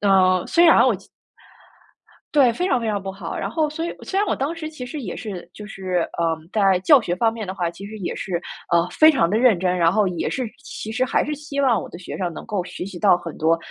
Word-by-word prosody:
呃， 185 -2 +4
虽 340 - +4
然 325 - +7
我 - - +3
其 - - -18 1.3
对， 270 -5 +5
非 355 +11 -1
常 255 -9 +1
非 225 - -2
常 205 -2 -1
不 195 0 -5
好。 190 -4 -6
然 - - -3
后 310 -2 0
所 325 +2 -4
以 - - -5
虽 390 - -2
然 415 - +1
我 - - +1
当 280 +5 -2
时 320 -2 -5
其 285 -6 -8
实 295 +4 -6
也 205 -9 -5
是 190 -6 -7
就 210 - -10
是， 185 -4 -2 0.2
呃， 165 -1 +1 0.2
在 195 -4 +3
教 280 - +6
学 175 -6 -2
方 225 +4 +2
面 225 -2 -6
的 185 - -5
话， 175 -3 -1
其 185 +4 -10
实 215 +2 -8
也 180 - -3
是， 175 -3 -3 0.3
呃， 170 +1 +3
非 315 - +6
常 170 - +2
地 210 - +1
认 230 -7 +4
真， 180 0 0
然 170 -1 +4
后 205 0 +2
也 175 -2 -2
是 260 - -2 0.2
其 220 -6 -7
实 250 +3 +1
还 260 - +1
是 300 - -4
希 285 -1 -4
望 245 -6 +3
我 - - -7
的 170 - -10
学 185 - -7
生， 175 -3 -2
能 - - -8
够 205 -5 -2
学 180 0 -7
习 190 -3 -8
到 195 -1 +5
很 170 -2 -7
多 165 +1 +2
205 Hz, 290 characters per minute, -22 LUFS, 180-265 Hz, 1.3 s, 然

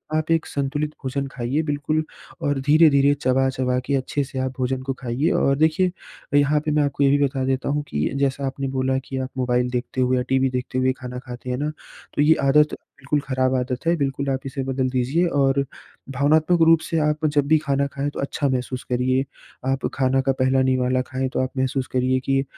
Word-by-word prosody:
आप 155 0 -1
एक 165 -1 +2
संतुलित 145 +2 -2
भोजन 135 +1 -2
खाइए 130 +5 -1
बिल्कुल 155 +1 -1 0.4
और 145 -1 0
धीरे-धीरे, 145 -1 +5
चबा-चबा 130 -2 0
के 140 - 0
अच्छे 135 +2 -1
से 135 0 -6
आप 130 0 -1
भोजन 130 0 -1
को 135 0 -2
खाइए। 130 +6 0
और 135 0 +2
देखिए 160 +4 +2 0.4
यहाँ 145 +1 +4
पे 155 - 0
मैं 150 0 +3
आपको 140 0 0
ये 140 - +5
भी 145 - +4
बता 135 -1 -1
देता 130 0 -1
हूँ 145 +1 0
कि 75 +1 -1
जैसा 140 0 0
आपने 135 +1 -3
बोला 130 0 +1
कि 135 - -5
आप 130 0 -3
मोबाइल 125 -1 +1
देखते 125 +1 -2
हुए 130 0 +2
या 125 - 0
टीवी 130 0 +2
देखते 125 0 -3
हुए 130 0 +2
खाना 125 0 -6
खाते 125 0 -9
हैं 125 - -1
ना 150 +3 -1 0.5
तो - - +2
ये 155 +2 +5
आदत 150 +2 +4 0.2
बिल्कुल 140 +2 0
ख़राब 130 -1 +1
आदत 125 +1 -2
है। 170 - +4
बिल्कुल 140 -1 -1
आप 135 -1 0
इसे 135 0 -4
बदल 130 0 -1
दीजिए 130 +7 +1 0.2
और 135 0 +2 0.5
भावनात्मक 155 +5 +2
रूप 165 -1 +6
से 165 - -2
आप 150 +1 0
जब 145 -2 +2
भी 155 +2 +5
खाना 140 0 +1
खाएँ 140 +1 -3
तो - - -7
अच्छा 140 +1 -1
महसूस 125 0 -2
करिए। 130 +2 +1 0.5
आप 135 0 -1
खाना 135 -1 +2
का 135 +1 +1
पहला 130 +1 +3
निवाला 130 -1 +1
खाएँ 130 0 -2
तो - - 0
आप 130 - -1
महसूस 130 0 -1
करिए 130 0 +2
की 135 0 +3
135 Hz, 215 wpm, -22 LUFS, 130-145 Hz, 0.5 s, रूप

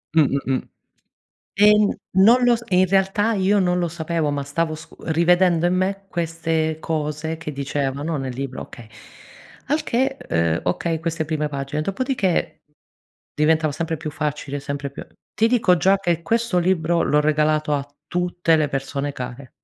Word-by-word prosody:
Mh, 160 - +7
mh, 140 0 -1
mh. 130 - 0 0.9
Ehm, 210 0 +5
n 190 -1 -1
non 240 +5 +6
lo 245 -1 +5
s 235 - -11
e 185 - +2
in 185 - +5
realtà 195 +4 +2
io 200 0 +2
non 180 -1 +1
lo 175 -1 0
sapevo, 160 -1 -2
ma 145 -1 -2
stavo 155 +3 -1
scu 160 +1 -12
rivedendo 170 +1 +3
in 180 - +1
me 195 +2 -1
queste 165 -2 -1
cose 155 0 -3
che 160 -1 -6
dicevano 140 +2 -2
nel 130 -2 -4
libro, 130 0 -5
okay. 120 -2 -12 0.8
Al 300 +3 +1
che, 265 +3 0
ehm, 85 0 +1
okay, 160 - -1
queste 165 -1 -2
prime 150 -1 -2
pagine, 140 +1 -3
dopodiché 195 - -1 0.7
diventava 155 0 +2
sempre 165 +2 -3
più 155 0 -5
facile, 150 -2 -3
sempre 140 0 -4
più 140 - -9 0.3
ti 220 - +3
dico 220 -7 +3
già 195 +4 +4
che 175 -4 0
questo 230 -2 +1
libro 170 -2 +1
l'ho 150 - +3
regalato 155 0 +1
a 140 0 -2 0.2
tutte 175 -2 +1
le 155 -2 +1
persone 140 +1 -3
care. 125 0 -7
160 Hz, 170 wpm, -22 LUFS, 145-185 Hz, 0.9 s, Mh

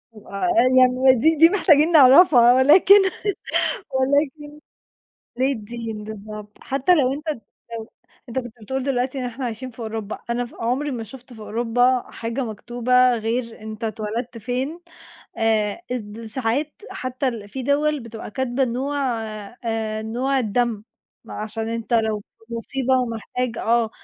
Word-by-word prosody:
آآ، 200 - -4 0.3
يعني 255 +1 +5
دي 315 +7 +3
دي 325 +2 +7
محتاجين 335 -5 +4
نعرفها، 265 -4 +7
ولكن 290 +10 +7 1.0
ولكن 285 +2 0 0.9
ليه 260 +2 +2
الدين 225 -2 -6
بالضبط؟ 210 0 -9
حتى 275 +7 +2
لو 270 -5 +2
أنت 300 +3 -6 0.5
لو 220 - -9 0.4
أنت 235 - -3
كنت 240 -3 -6
بتقول 265 +5 -3
دلوقتي 260 0 -1
إن 255 - -3
إحنا 245 +2 -5
عايشين 245 +2 -5
في 230 - -21
أوروبا، 220 -2 -5
أنا 240 +1 0
ف - - -16
عمري 255 +6 -1
ما 235 -4 -4
شُفت 250 +3 -13
في 225 - -12
أوروبا 240 +3 +1
حاجة 230 +4 -4
مكتوبة 245 +3 +2
غير 230 +1 -3
أنت 220 +1 -7
اتولدت 220 +2 -4
فين، 255 +9 -3 0.6
آآ، 220 +3 +1
اد 225 -2 -5
ساعات 260 +6 -2 0.2
حتى 255 +2 -3
ال 220 -5 -5
في 265 +3 -5
دوَل 295 +2 +1
بتبقى 230 -2 -9
كاتبة 260 +3 -1
نوع 265 +4 -2 0.7
آآ، 220 -1 -2
نوع 250 +5 -1
الدم، 230 -1 -1 0.4
ما - - -10
عشان 220 +1 -4
أنت 230 +1 -4
لو 220 -2 +2 0.3
في 235 - -9
مصيبة 260 +2 -1
ومحتاج 235 0 -3
آه، 230 -1 +1
245 Hz, 145 wpm, -22 LUFS, 225-265 Hz, 1.0 s, دي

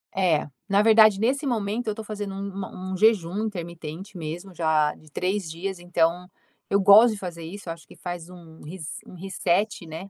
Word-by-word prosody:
é, 175 -6 +2 0.2
na 200 +1 +4
verdade, 215 -2 +6
nesse 265 +7 +1
momento, 225 -2 -1
eu - - +2
estou 215 +1 -7
fazendo 205 -2 -5
um 195 +1 -4
uma 190 -1 -6
um - - -2
jejum 205 -2 +3
intermitente 175 0 -6
mesmo, 175 +4 -6
já 155 -3 +2
de 155 - -19
3 185 0 -1
dias, 190 +4 -4
então, 175 0 0 0.4
eu 200 - +3
gosto 210 +4 +8
de 210 - -7
fazer 170 -3 -6
isso, 180 +3 -8
eu 165 - -1
acho 165 - -16
que - - -15
faz 175 -1 -6
um 170 -3 -14
res 160 0 -8 0.2
um - - -13
reset, 190 +1 -1
né. 165 +5 -8
185 Hz, 195 wpm, -25 LUFS, 170-205 Hz, 0.4 s, gosto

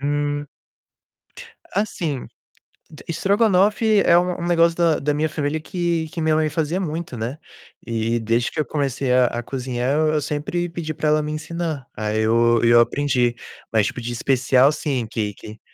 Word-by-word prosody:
Hum. 145 0 -1 1.3
Assim, 170 - -2 0.6
d 155 - -13
estrogonofe 205 +3 +3
é 170 - +6
um 180 0 0
um 175 - -2
negócio 170 -1 +3
da 170 -2 +2
da 150 +1 0
minha 155 +1 0
família 150 +1 -2
que 170 -1 -2
que 165 - -4
minha 155 -1 +2
mãe 155 0 +1
fazia 160 +4 -1
muito, 165 -5 -4
né, 115 +6 -4 0.5
e 115 0 -1
desde 115 +2 0
que 155 - -5
eu 150 - +1
comecei 135 -3 -1
a 125 0 +5
a 120 +1 -4
cozinhar 125 0 -3 0.2
eu 155 -1 +1
sempre 150 +5 -2
pedi 165 -2 -5
pra 155 0 -1
ela 155 0 +3
me 150 - -4
ensinar. 155 -2 -4
Aí 110 +1 -1
eu 115 +1 +3
e 115 - +4
eu 120 0 +7
aprendi, 125 -1 +1 0.4
mas 110 -3 +2
tipo 125 - -5
de 120 +1 -4
especial 130 +2 +3
sim, 135 -7 -2
que 105 -3 -2
que 110 +2 -11
145 Hz, 175 wpm, -21 LUFS, 120-165 Hz, 1.3 s, eu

